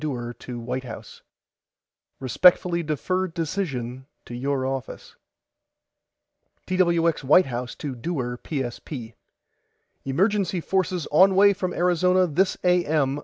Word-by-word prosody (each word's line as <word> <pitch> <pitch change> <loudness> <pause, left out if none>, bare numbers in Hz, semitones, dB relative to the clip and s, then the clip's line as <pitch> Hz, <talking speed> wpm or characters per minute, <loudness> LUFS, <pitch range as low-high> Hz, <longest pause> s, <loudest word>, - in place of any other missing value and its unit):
DEWAR 120 -6 -4
TO 120 0 -8
WHITE 125 +3 -4
HOUSE: 125 - -10 1.0
RESPECTFULLY 170 +6 +3
DEFER 185 +5 -1
DECISION 145 -7 -4 0.2
TO - - -10
YOUR 130 +2 -2
OFFICE 135 -1 -6 1.5
TWX 170 -4 +1
WHITE 155 +7 +5
HOUSE 125 -1 -5
TO 145 -3 -5
DEWAR 125 -2 -4
PSP: 125 -3 -5 0.9
EMERGENCY 190 +5 0
FORCES 180 -1 -1
ON 190 +5 +5
WAY 200 +1 +6
FROM 185 -2 -4
ARIZONA 180 +1 +3
THIS 190 +5 +2
A.M. 155 -6 +2
155 Hz, 110 wpm, -24 LUFS, 130-180 Hz, 1.5 s, WAY